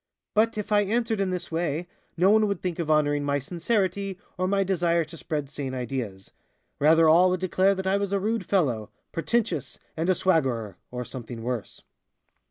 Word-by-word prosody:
But 225 +1 +2
if 210 0 -4
I 205 0 +5
answered 220 +1 0
in 195 - +1
this 180 -2 -4
way, 165 0 -1 0.3
no 185 +4 +5
one 215 0 +4
would 200 -3 -1
think 180 -2 -3
of 165 -2 -2
honoring 145 -1 +2
my 140 0 +1
sincerity, 190 - -1 0.2
or 185 0 -1
my 195 +1 +2
desire 170 -3 +1
to 165 - -12
spread 150 -3 -3
sane 135 -2 -5
ideas 120 -7 -4 0.5
rather 160 +2 +5
all 175 +4 +6
would 185 0 0
declare 185 +2 +2
that 190 0 -4
I 190 +1 +2
was 200 -1 -2
a 200 - +1
rude 220 +3 -1
fellow, 125 - 0 0.2
pretentious 230 +7 -1 0.2
and 165 +3 -1
a 185 - +4
swaggerer, 130 - +1
or 125 0 -5
something 120 -2 -7
worse. 120 -3 -4
170 Hz, 185 wpm, -26 LUFS, 145-195 Hz, 0.5 s, all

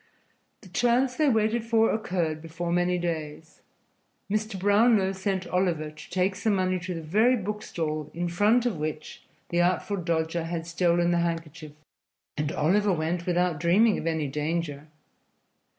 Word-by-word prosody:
The 195 - -15
chance 245 +6 +2
they 305 0 +3
waited 220 0 +1
for 225 -1 +3
occurred 175 -7 -2
before 165 +1 -5
many 175 +1 +1
days. 160 -3 -5 0.7
Mr. 215 -1 -1
Brownlow 205 0 +4
sent 190 -1 -2
Oliver 175 -4 -1
to 155 - -13
take 185 +1 +1
some 205 +2 0
money 185 -1 0
to 175 +1 -5
the 165 - -6
very 215 +11 +3
book 210 0 -4
stall 155 -5 -4
in 175 +1 -3
front 210 +8 +2
of 235 -8 0
which 155 0 -5 0.3
the 175 0 +2
Artful 185 +3 0
Dodger 165 -1 -1
had 165 -1 -4
stolen 170 0 +1
the 175 - +2
handkerchief, 165 -2 -4 0.6
and 150 0 -2
Oliver 200 +8 +2
went 170 +1 -2
without 175 -3 +1
dreaming 200 +7 +3
of - - -4
any 160 -3 0
danger. 150 +1 -3
175 Hz, 155 wpm, -26 LUFS, 160-205 Hz, 0.7 s, Brownlow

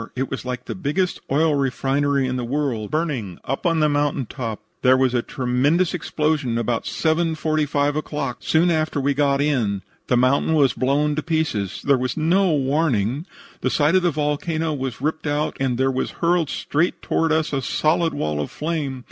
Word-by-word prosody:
It 130 +1 -2
was 135 -2 -4
like 125 0 -4
the - - -4
biggest 180 +2 -1
oil 155 +2 +3
refinery 140 0 +1
in 130 0 -2
the 125 - -2
world 125 -4 -2
burning 140 - -2
up 135 +7 -1
on 165 -2 +2
the 155 - +4
mountain 145 -2 0
top. 115 -3 -5 0.2
There 130 0 +5
was 130 -1 +2
a 120 - +2
tremendous 135 +9 +1
explosion 150 -7 -1
about 115 0 -1
7.45 155 -3 0
o'clock, 145 -4 -3
soon 170 +2 +2
after 155 -2 0
we 140 +1 +1
got 140 0 +2
in. 115 -10 0 0.2
The 125 - +3
mountain 135 +5 +3
was 140 -4 +4
blown 145 +3 +1
to - - +1
pieces. 155 - -2
There 140 -2 +4
was 130 +4 -2
no 175 +4 +3
warning. 140 - 0 0.3
The - - 0
side 150 +2 +2
of 185 - +5
the 175 - +2
volcano 155 +1 -1
was 130 -3 -4
ripped 155 +1 -2
out, 145 +1 -1
and 130 -3 0
there 135 +1 +2
was 130 - -2
hurled 170 -2 +1
straight 160 +5 -1
toward 165 0 +1
us 155 -1 +1
a 135 - 0
solid 165 +5 +1
wall 75 -1 -1
of 75 - -4
flame. 150 -4 -3
145 Hz, 185 wpm, -22 LUFS, 130-155 Hz, 0.3 s, There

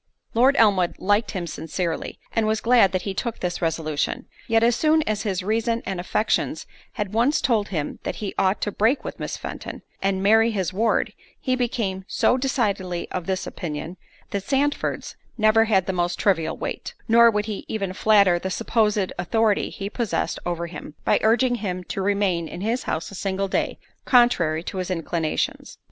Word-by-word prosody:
Lord 255 +4 +4
Elmwood 195 -6 +4
liked 205 +3 +1
him 185 -4 -3
sincerely, 165 +1 -4 0.2
and 225 -1 +2
was 220 0 +1
glad 230 -5 +5
that 185 -1 -1
he 195 - -3
took 230 +4 -3
this 180 -1 -3
resolution; 160 -3 -1 0.2
yet 225 0 +3
as 235 0 +4
soon 310 +3 +3
as 215 -5 -1
his 190 -3 -2
reason 230 +3 0
and 190 -2 -3
affections 200 +4 0 0.3
had 205 -1 -4
once 240 +7 +3
told 220 -5 +1
him 155 -6 -3
that - - -4
he 205 -3 -4
ought 190 +1 +1
to 210 - -1
break 225 +8 +2
with - - -7
Miss - - -4
Fenton, - - -7 0.2
and 195 -1 0
marry 225 +3 +5
his 190 -5 -2
ward, 225 +4 +1 0.3
he 255 -1 0
became 225 -6 -2
so - - +2
decidedly 200 -9 -1
of 180 -2 -4
this 190 -1 -1
opinion, 160 +1 -5 0.4
that 200 - -1
Sandford's 280 +5 -1 0.2
never 215 0 +4
had 195 -5 +2
the 190 - -2
most 175 -1 0
trivial 185 -6 +1
weight; - - -5
nor 235 0 +7
would 210 -1 0
he 215 -2 -5
even 195 -4 -3
flatter 200 -3 +4
the 190 - -3
supposed 210 -1 +1
authority 215 +3 +1
he 200 - -6
possessed 225 0 -2
over 170 -1 -2
him, 170 -3 -9
by - - +3
urging 245 +3 +3
him 185 -3 -3
to 195 - -4
remain 190 -4 +1
in 175 - -7
his 230 +5 0
house 160 +4 -3
a - - -10
single 195 0 -2
day, - - -1 0.3
contrary 180 - +3
to 190 - -6
his 185 0 -3
inclinations. 165 -2 -2
200 Hz, 185 wpm, -24 LUFS, 180-225 Hz, 0.4 s, nor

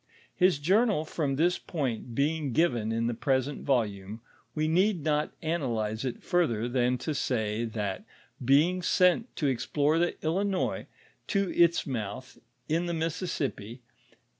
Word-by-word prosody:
His 185 -4 +4
journal 190 +2 +2
from 145 -4 -1
this 175 +5 +2
point 125 -7 -4
being 145 -1 0
given 120 -9 +1
in 115 +1 0
the 120 - 0
present 135 +3 -1
volume, 110 -5 -1 0.4
we 155 0 +1
need 180 +1 +2
not 150 0 -1
anolyze 120 -9 -1
it 125 -3 -4
further 120 -11 +1
than 125 0 +1
to 150 +5 -3
say, 115 -4 -1
thot 105 -4 -3 0.4
being 155 +8 +4
sent 180 +7 +2
to 150 - -2
explore 145 +4 +1
the 175 0 +1
Blinois 190 +4 -1 0.4
to 200 -3 0
its 170 0 +4
mouth, 120 -1 -5 0.3
in 165 +3 0
the 170 - -1
Mississippi 155 - -3
(p. 125 - -20
145 Hz, 140 wpm, -28 LUFS, 120-170 Hz, 0.4 s, His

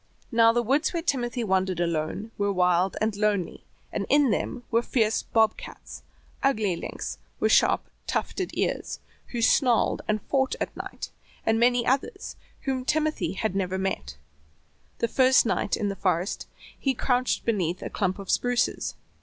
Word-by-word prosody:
Now 230 0 +6
the 240 +1 +1
woods 280 +9 +1
where 335 -1 -2
Timothy 245 -5 -1
wandered 190 -3 +1
alone 170 +5 -2
were 200 0 0
wild 180 0 +2
and 215 -1 0
lonely, 205 -3 0 0.3
and - - -2
in 285 -4 +4
them 245 +3 -2
were 230 0 +4
fierce 225 -3 +1
"Bob 220 -1 +2
Cats," - - -10 0.4
ugly 215 -9 +2
lynx - - -6 0.2
with - - +2
sharp, - - +4 0.2
tufted 375 -2 -2
ears, - - -1 0.3
who 235 -2 -3
snarled 245 -1 +3
and 215 0 +1
fought 265 -1 +1
at - - -3
night, - - -7 0.3
and 225 0 +2
many 245 0 +3
others 275 +9 -1 0.3
whom 265 -3 -2
Timothy 305 - 0
had 195 -1 -2
never 190 -1 -1
met. 70 - -3 0.8
The 235 - 0
first 260 +2 +5
night 210 - 0
in 205 - -1
the 195 - -3
forest 180 0 -1 0.3
he 270 -2 0
crouched 250 +1 0
beneath 185 -6 0
a - - -4
clump 190 -3 -1
of 195 -2 -4
spruces. 245 0 0
225 Hz, 160 wpm, -26 LUFS, 190-250 Hz, 0.8 s, Now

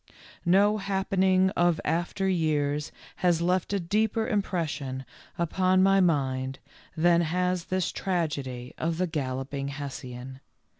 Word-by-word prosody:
No 205 +4 +4
happening 190 -1 +2
of 175 -3 +2
after 175 +4 0
years 150 -4 0 0.3
has 175 -2 +2
left 180 +2 +1
a 200 - +1
deeper 215 +5 0
impression 160 - -2 0.3
upon 185 +2 +2
my 195 0 +5
mind 135 -6 +1 0.4
than 170 +1 +4
has 180 +1 0
this 185 -1 -1
tragedy 140 -9 -3
of 165 0 -1
the 185 - +1
Galloping 135 -3 -3
Hessian. 130 -2 -7
170 Hz, 115 wpm, -27 LUFS, 145-185 Hz, 0.4 s, my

